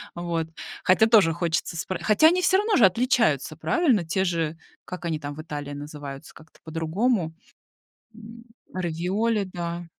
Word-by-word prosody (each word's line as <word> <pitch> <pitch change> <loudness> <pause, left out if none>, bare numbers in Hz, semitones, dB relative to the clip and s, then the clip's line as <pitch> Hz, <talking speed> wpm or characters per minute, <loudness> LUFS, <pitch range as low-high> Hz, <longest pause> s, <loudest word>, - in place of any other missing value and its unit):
Вот, 170 -2 -2 0.4
хотя 205 +4 +4
тоже 200 -8 +5
хочется 170 0 -2
спр 175 +3 -3
хотя, 215 +9 +5
они 360 +2 +3
все-равно 395 +4 +3
же 225 - +7
отличаются, 185 - +2
правильно? 250 - +2
Те 190 +4 0
же, 165 -3 -1 0.3
как 180 -1 -7
они 160 -2 -2
там 145 -1 -6
в 155 - -7
Италии 145 -2 -6
называются? 145 0 -8
Как-то 160 0 -18
по-другому. 165 +3 -1 0.8
М, 230 +1 -12 0.3
равиоли, 185 +5 -1
да. 170 0 -5
175 Hz, 145 wpm, -25 LUFS, 160-220 Hz, 0.8 s, же